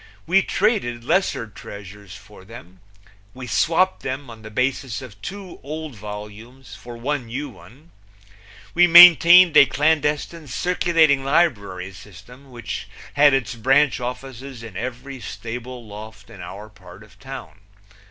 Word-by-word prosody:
We 190 +4 +3
traded 185 - -1
lesser 170 -4 0
treasures 100 -2 -12
for 100 -1 -15
them; 95 -4 -14 0.6
we 130 0 -8
swapped 170 +8 +1
them 130 -1 -6
on 110 -1 -13
the 110 - -10
basis 125 +1 -2
of 110 -7 -13
two 195 - -9
old 155 +1 -7
volumes 105 +4 -10
for 120 -1 -11
one 130 +1 -3
new 135 +6 -5
one; 145 +8 -18 0.8
we 175 +1 +5
maintained 175 0 +8
a 140 - +8
clandestine 150 +3 -1
circulating 160 -2 +1
library 105 - 0
system 120 +8 -15
which 120 -6 -7 0.3
had 145 -1 +5
its 115 -6 -2
branch 135 +5 +2
offices 125 0 -7
in 110 -5 -10
every 130 +4 -6
stable 120 +1 -8
loft 110 +1 -12
in 100 - -12
our 100 +4 -9
part 95 -2 -16
of 105 -1 -21
town. 135 -4 -10
125 Hz, 135 wpm, -21 LUFS, 110-150 Hz, 0.8 s, maintained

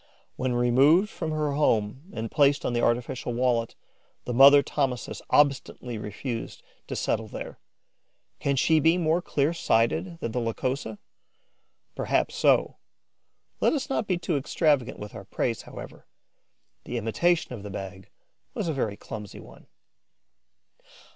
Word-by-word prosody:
When 130 -1 -1
removed 140 - +4
from 160 - -4
her 155 -1 -1
home 130 - 0
and 115 -6 -5
placed 145 -1 +3
on - - 0
the 120 - +1
artificial 120 +1 -1
wallet, 120 -2 0 0.5
the 125 - -3
mother 140 +3 +8
Thomisus 130 -4 -2
obstinately 135 -5 +1
refused 115 +3 -6 0.2
to - - -4
settle - - -1
there. - - -8 0.8
Can 140 - 0
she 160 +4 +3
be 165 +4 +4
more 165 0 +1
clear 145 -1 0
sighted 165 +5 +1
than 115 - -3
the 125 - -1
Lycosa? 115 0 -3 1.0
Perhaps - - 0
so. - - +2 0.8
Let - - +3
us 275 -3 -3
not 220 -5 -1
be 185 - +1
too 170 -3 -1
extravagant 140 -2 +1
with 105 0 -8
our 100 - -9
praise, 115 +3 -2
however; - - -11 0.8
the 120 - -4
imitation 145 +8 +1
of 115 - -7
the 105 - -7
bag 95 -1 -8 0.5
was 200 - -2
a 160 - 0
very 110 -7 -2
clumsy 105 -3 -8
one. - - -15
130 Hz, 140 wpm, -26 LUFS, 115-155 Hz, 1.0 s, mother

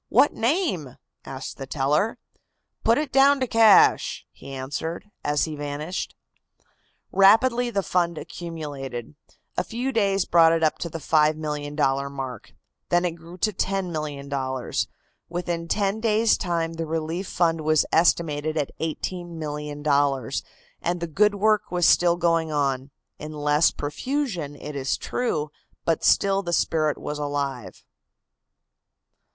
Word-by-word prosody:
"What 290 - +4
name?" 230 - -1 0.3
asked 135 0 -7
the 135 - -7
teller. 150 +11 +1 0.7
"Put 230 +1 +4
it 300 -3 -2
down 275 +1 +5
to 260 - +1
'cash,'" 225 -4 +5
he - - -12
answered, 145 +9 -5
as 145 0 +1
he 155 -2 -5
vanished. 145 +4 -4 1.0
Rapidly 235 +6 +5
the 200 -4 -1
fund 170 -2 0
accumulated. 145 -9 -6 0.4
A - - +2
few 245 +4 -3
days 200 -5 +1
brought 165 -1 +5
it 165 0 +1
up 155 - +2
to 170 - -3
the 165 - -5
$5,000,000 150 -2 +1
mark. 135 -2 -7 0.4
Then 175 +1 +3
it 175 - +1
grew 165 +2 -12
to 215 +3 0
$10,000,000. 145 -9 -2 0.4
Within 170 -1 -3
ten 200 +3 0
days' 220 0 +3
time 170 -3 -2
the 165 0 -4
relief 165 +4 -3
fund 165 -2 +1
was 155 -1 +3
estimated 155 -2 +2
at 145 -3 -1
$18,000,000, 150 -5 -2 0.4
and 175 +1 -1
the 170 - -2
good 205 +6 +2
work 215 0 +2
was 175 -1 +2
still 175 -1 +5
going 165 -2 +1
on 135 -2 0 0.3
in 155 +1 -7
less 150 +1 +3
profusion, 175 - -3
it 145 +1 -8
is 135 -1 -1
true, 155 -12 -2 0.3
but 165 -2 +1
still 195 0 +3
the 175 -3 -4
spirit 155 -2 +1
was 150 0 -5
alive. 140 -5 -4
165 Hz, 135 wpm, -24 LUFS, 145-190 Hz, 1.0 s, down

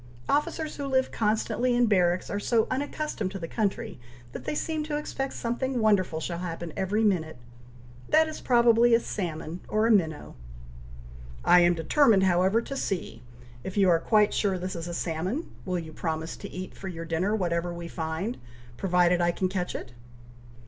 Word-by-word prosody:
Officers 300 +2 -1
who 285 -1 -3
live 260 -1 +1
constantly 225 +3 0
in 245 0 +4
barracks 180 -4 +2
are 205 - -1
so 225 +1 +2
unaccustomed 280 -5 -2
to 195 - -6
the 165 -3 -5
country, 215 - -2 0.3
that - - -8
they - - -2
seem 315 0 -2
to 300 -1 -2
expect 270 -2 -3
something 245 +2 -2
wonderful 195 -7 +2
shall 170 +1 -4
happen 170 -2 -5
every 205 +4 0
minute! 165 - +1 0.7
That 315 +1 +5
is 310 - -7
probably 235 -1 +5
a - - +4
salmon 170 -5 -4
or 215 +1 +1
a 230 - +4
minnow." 160 -8 +1 1.1
"I 180 - +7
am 175 0 +4
determined, 210 - +4
however, 190 +5 +3
to 275 - -6
see. 185 - -3 0.4
If 190 - -6
you 195 -2 +5
are 165 -1 +4
quite 210 +3 +3
sure 195 -3 +1
this 185 +1 -4
is 170 0 -5
a 175 - -5
salmon, 180 - -3
will 185 -2 -1
you 160 -2 -7
promise 160 0 -3
to 200 - -8
eat 185 0 -7
for 195 - -8
your 165 -3 -6
dinner 170 +6 0
whatever 175 -3 -1
we 170 0 -6
find, 165 +8 -4 0.4
provided 180 0 +3
I 175 - +3
can 185 +2 -1
catch 180 -1 -3
it?" 125 - -7
190 Hz, 180 wpm, -27 LUFS, 175-235 Hz, 1.1 s, I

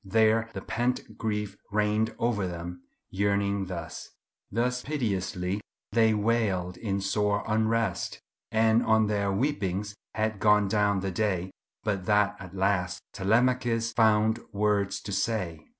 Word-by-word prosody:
There 110 +2 +3
the 95 - -5
pent 120 +5 -2
grief 105 -2 -2
rained 105 +2 +1
o'er 110 -5 +1
them, 85 0 -6 0.3
yearning 100 0 0
thus. 90 -2 -6 0.4
Thus 125 +4 0
piteously 100 -8 -2 0.3
they 110 -2 +4
wailed 105 -5 0
in 100 -3 -2
sore 100 +1 +1
unrest, 110 +1 0 0.3
And 110 +1 +4
on 110 0 +4
their 100 -1 0
weepings 105 -4 -1 0.2
had 110 -1 -1
gone 105 0 +4
down 100 -1 +2
the 95 0 -2
day, 95 -2 -1 0.3
But 100 -4 -1
that 105 -1 +3
at 95 -1 -10
last 95 -2 0
Telemachus 115 +2 +1
found 110 0 +3
words 100 -1 +1
to 100 - -6
say." 95 -5 -2
105 Hz, 130 wpm, -28 LUFS, 95-110 Hz, 0.4 s, they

